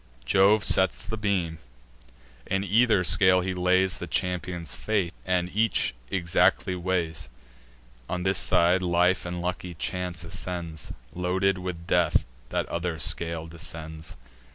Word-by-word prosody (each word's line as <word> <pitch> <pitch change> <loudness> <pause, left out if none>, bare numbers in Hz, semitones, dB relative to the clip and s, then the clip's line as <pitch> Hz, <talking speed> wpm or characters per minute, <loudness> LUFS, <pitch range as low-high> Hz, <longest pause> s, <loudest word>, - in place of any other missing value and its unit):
Jove 100 +2 +4
sets 95 -4 +3
the 110 - -4
beam; 95 -7 -1 0.9
in 95 +1 0
either 110 0 +3
scale 90 0 +5
he 90 0 -2
lays 90 -1 +2
The - - -5
champions' 90 -2 -2
fate, 100 -5 -1
and 90 -1 0
each 110 - +1 0.2
exactly 90 +1 +2
weighs. 85 -6 -2 0.8
On 90 0 -2
this 95 -1 +3
side, 90 +2 +3
life 90 +1 +2
and 90 0 -4
lucky 90 0 -4
chance 90 +1 -3
ascends; 85 -3 -5 0.2
Loaded 90 +2 0
with 90 -2 -6
death, - - +2 0.2
that - - -1
other 85 -1 -3
scale 80 +1 +1
descends. 80 -1 -7
90 Hz, 130 wpm, -26 LUFS, 85-95 Hz, 0.9 s, scale